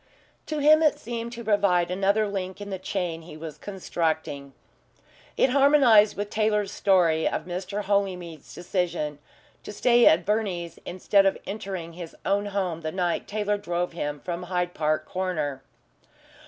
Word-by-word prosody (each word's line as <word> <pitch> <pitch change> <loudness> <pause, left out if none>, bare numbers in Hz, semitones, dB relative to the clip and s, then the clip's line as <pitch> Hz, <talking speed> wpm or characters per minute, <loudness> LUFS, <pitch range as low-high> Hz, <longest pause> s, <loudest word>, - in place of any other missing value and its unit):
To 310 - -3
him 305 +2 +6
it 305 -2 +3
seemed 235 0 -5
to 235 0 -7
provide 190 -5 +2
another 200 +3 +2
link 190 -2 -4
in 205 0 -7
the 190 - -4
chain 175 -3 -3
he 160 -1 -11
was 155 -1 -8
constructing. 160 -7 -3 0.8
It 260 - +3
harmonised 270 -6 +5
with 205 0 -4
Taylor's 210 -2 +1
story 170 -5 +3
of - - -3
Mr. 185 +3 -4
Holymead's 185 -6 -2
decision 175 -5 -2 0.4
to - - -8
stay 240 +3 +4
at 170 +2 +5
Verney's 190 -5 -2
instead 195 +2 +2
of 195 - +1
entering 190 -5 -5
his 170 -1 -9
own 200 +1 +1
home 185 -5 -2
the 155 -1 -3
night 180 -1 -1
Taylor 210 0 -1
drove 175 -2 -2
him 145 -3 -4
from 175 -1 -4
Hyde 180 -1 -2
Park 155 0 0
Corner. 155 -7 -3
185 Hz, 155 wpm, -26 LUFS, 170-205 Hz, 0.8 s, him